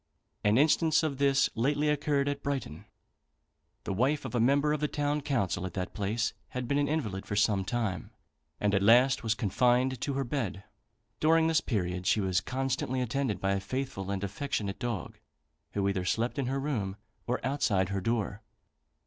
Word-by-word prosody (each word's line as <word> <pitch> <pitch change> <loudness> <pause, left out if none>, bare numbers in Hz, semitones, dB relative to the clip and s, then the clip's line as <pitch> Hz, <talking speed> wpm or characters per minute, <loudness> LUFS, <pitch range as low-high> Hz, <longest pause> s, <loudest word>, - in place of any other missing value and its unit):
An 105 +2 +4
instance 160 +2 +4
of 140 -4 -2
this 140 -1 +4
lately 145 +5 +1
occurred 145 -1 +1
at 145 0 -2
Brighton. 135 - -4 1.0
The 95 - -3
wife 135 +9 +1
of - - -5
a 120 - +1
member 140 +5 +3
of 150 - -1
the 150 - +1
town 145 0 -1
council 120 - -1
at 95 -2 -5
that 95 0 -3
place 110 +3 -1
had 125 -1 -5
been 140 +3 +1
an 145 - +1
invalid 115 -11 -2
for 100 - -3
some 100 -2 +2
time, 105 -2 -2 0.5
and 105 -1 +1
at 100 - +3
last 120 +5 +5
was 110 -2 0
confined 125 +4 +2
to 140 - -1
her 135 0 0
bed. 120 -8 -3 0.6
During 160 +1 +4
this 160 -1 +3
period 90 -5 -2
she - - +3
was 95 -2 +1
constantly 130 +1 -2
attended 125 -4 -1
by 95 +1 0
a 100 - +1
faithful 130 -3 -4
and 100 -1 -2
affectionate 100 -2 -3
dog, 120 -6 -4 0.5
who 100 -1 0
either 100 -2 0
slept 115 +8 0
in 135 - -1
her 135 +2 -1
room 115 -10 -2 0.3
or 125 +1 0
outside 110 -9 +1
her 100 -1 -2
door. 110 -1 -1
120 Hz, 180 wpm, -30 LUFS, 100-140 Hz, 1.0 s, last